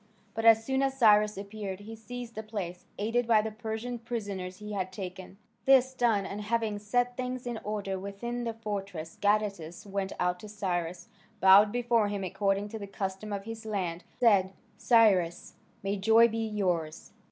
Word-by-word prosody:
But 225 +1 -3
as 225 0 +7
soon 265 +1 +1
as 270 -1 0
Cyrus 210 -4 +5
appeared 200 -1 -6
he 220 +2 -8
seized 240 +1 -8
the 220 - -5
place, 195 -5 -6
aided 230 +3 0
by 220 -2 +5
the 220 - -3
Persian 225 +2 -5
prisoners 200 -6 -5
he 210 0 -7
had 185 -2 -2
taken. 185 0 -8 0.3
This 265 -1 +5
done, 230 -6 +2
and 200 +2 -5
having 220 -1 -1
set 245 +4 0
things 255 0 -4
in 240 -2 -3
order 200 -2 -3
within 235 +5 -5
the 230 -1 -3
fortress, 200 -7 -5
Gadatas 205 -5 0
went 195 -1 -3
out 180 0 0
to 215 - -10
Cyrus, 180 -4 -3 0.3
bowed 200 +2 +7
before 235 -2 +2
him 200 -1 -3
according 195 +2 0
to 220 - -6
the 200 - -6
custom 195 +1 -4
of 200 -1 -3
his 225 +1 -7
land, 185 -5 -3
and - - -33
said, 195 -5 +4 0.2
"Cyrus, 205 -7 +3 0.3
may 200 +1 -1
joy 225 +4 +6
be 225 0 -2
yours!" 180 -7 -2
210 Hz, 175 wpm, -29 LUFS, 195-225 Hz, 0.3 s, as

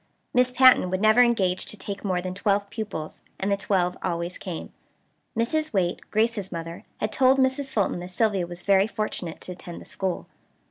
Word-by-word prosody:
Miss 250 0 +4
Patten 255 -6 +6
would 185 +1 -1
never 215 +3 +6
engage 195 -7 +2
to 215 - -6
take 200 +1 -6
more 185 -3 0
than 185 0 -3
twelve 200 0 0
pupils; 210 -9 -5 0.2
and 195 +1 -1
the - - +4
twelve 185 -3 0
always 170 +1 -3
came. 175 -4 -6 0.6
Mrs. 310 +6 0
Waite, 180 -3 +1
Grace's 215 -3 0
mother, 165 0 -6
had 215 - -1
told 260 +3 +4
Mrs. 265 +1 +1
Fulton 200 -7 0
that 175 - -6
Sylvia 195 -2 +1
was 175 0 -8
very 195 0 +4
fortunate 215 -6 -4
to - - -6
attend 175 -1 -8
the - - -12
school. 190 -2 -3
200 Hz, 185 wpm, -25 LUFS, 180-230 Hz, 0.6 s, Patten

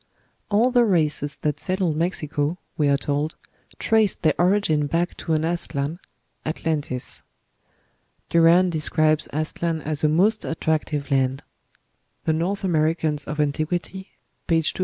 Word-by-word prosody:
All 220 +5 +3
the 245 -1 +5
races 155 -7 +1
that 150 -1 0
settled 180 -1 -1
Mexico, 155 -1 -1 0.2
we 150 - +1
are 140 0 +3
told, 145 +3 -2 0.4
traced 220 -3 +1
their 155 - +4
origin 175 -5 +2
back 170 +4 -1
to 165 - -2
an 155 0 +1
Aztlan 165 -2 -2 0.4
(Atlan 155 -1 -1
tis). 130 -3 -6 1.1
Duran 170 +2 +5
describes 155 -1 +2
Aztlan 160 +2 -2
as 155 0 -1
"a 155 - +4
most 200 +8 +2
attractive 155 -2 -2
land." 135 -1 +1 0.8
("North 170 +5 0
Amer. 155 -4 +2
of 165 +2 0 0.4
Antiq.," 150 +1 0
p. 180 - +2
257.) 190 +3 -10
160 Hz, 130 wpm, -23 LUFS, 150-175 Hz, 1.1 s, the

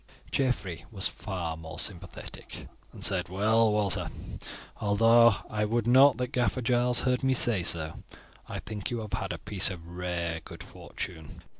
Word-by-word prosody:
Geoffrey 105 -11 -1
was 100 -5 0
far 90 -5 -4
more 80 0 -9
sympathetic, 90 -3 -4 0.2
and - - -3
said 90 -2 +1
"Well, 110 +4 +3
Walter, 105 -2 +1 0.7
although 115 +2 +5
I 105 0 -2
would 115 +1 0
not 130 +1 +6
that 125 -1 -3
Gaffer 125 0 0
Giles 120 0 +3
heard 125 0 0
me 130 0 +3
say 115 -6 +3
so, 80 -2 +1 0.6
I - - -4
think 105 -2 -5
you 120 - -2
have 105 -2 -8
had 95 +1 -2
a - - -4
piece 100 -2 +3
of 90 -4 -8
rare 85 -2 -3
good - - -9
fortune. 80 -5 -8
105 Hz, 160 wpm, -28 LUFS, 90-120 Hz, 0.7 s, not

